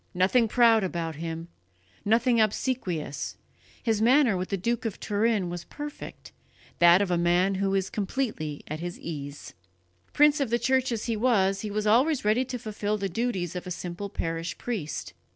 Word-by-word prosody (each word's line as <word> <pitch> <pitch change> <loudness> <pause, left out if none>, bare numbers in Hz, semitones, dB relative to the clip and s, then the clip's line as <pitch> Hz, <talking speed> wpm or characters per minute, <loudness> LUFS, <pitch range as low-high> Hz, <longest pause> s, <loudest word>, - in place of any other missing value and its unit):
Nothing 200 +6 +3
proud 225 -1 +4
about 165 -4 -3
him, 165 +1 -5 0.6
nothing 230 +2 +3
obsequious, 195 - -2 0.5
his 225 -3 +1
manner 250 -1 +5
with 185 0 -3
the 195 - -1
Duke 230 +5 -1
of 225 -4 -4
Turin 210 -2 +1
was 175 0 -6
perfect, 295 0 -8 0.5
that 175 +3 +7
of 185 - -3
a 175 - +2
man 175 +3 +3
who 195 0 +1
is 190 -1 -1
completely 200 - -3
at 155 +1 -5
his 175 +1 -6
ease." 145 -3 -7 0.6
Prince 295 0 +4
of 275 - 0
the 235 - +2
Church 260 +2 +1
as 225 -2 -2
he 230 - -1
was, 200 -4 +2
he 215 - -4
was 210 +1 -2
always 255 +5 +3
ready 220 +5 +3
to 255 0 -4
fulfil 215 -2 -3
the 195 -1 -2
duties 190 -4 -2
of 180 - -5
a - - -4
simple 180 +3 -5
parish 165 -2 -3
priest. 150 - -4
205 Hz, 175 wpm, -27 LUFS, 175-235 Hz, 0.6 s, that